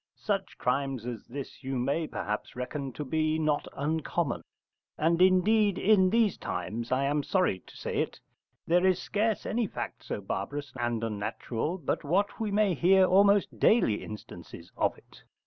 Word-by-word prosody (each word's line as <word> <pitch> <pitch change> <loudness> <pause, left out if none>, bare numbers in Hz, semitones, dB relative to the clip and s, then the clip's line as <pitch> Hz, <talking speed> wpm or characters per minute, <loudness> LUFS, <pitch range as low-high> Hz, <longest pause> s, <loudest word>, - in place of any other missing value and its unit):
Such 195 -2 -2
crimes 135 -1 -1
as 120 -2 -6
this 140 +2 -8
you 135 0 -2
may 140 +6 0
perhaps 105 -5 -4
reckon 135 +2 -4
to 150 - -5
be 155 +2 +1
not 155 -2 0
uncommon, 155 -1 -1 0.6
and, 165 +3 +2
indeed, 195 +2 +4
in 190 -2 +4
these 220 -1 +2
times, 115 +3 -4
I 130 +1 +2
am 145 +2 +1
sorry 180 - +1
to - - -14
say - - -4
it, - - -2 0.5
there 175 +2 +3
is 185 -1 +3
scarce 215 +1 -1
any 230 -1 0
fact - - -6
so - - -4
barbarous 140 +9 -4
and 120 -1 -1
unnatural 115 - -3
but 160 - -2
what 190 +10 0
we 220 -2 -1
may 205 -1 +2
hear 185 +4 +5
almost 200 +2 +4
daily 210 - +3
instances 105 -4 -10
of - - 0
it. - - -19
155 Hz, 165 wpm, -29 LUFS, 125-190 Hz, 0.6 s, hear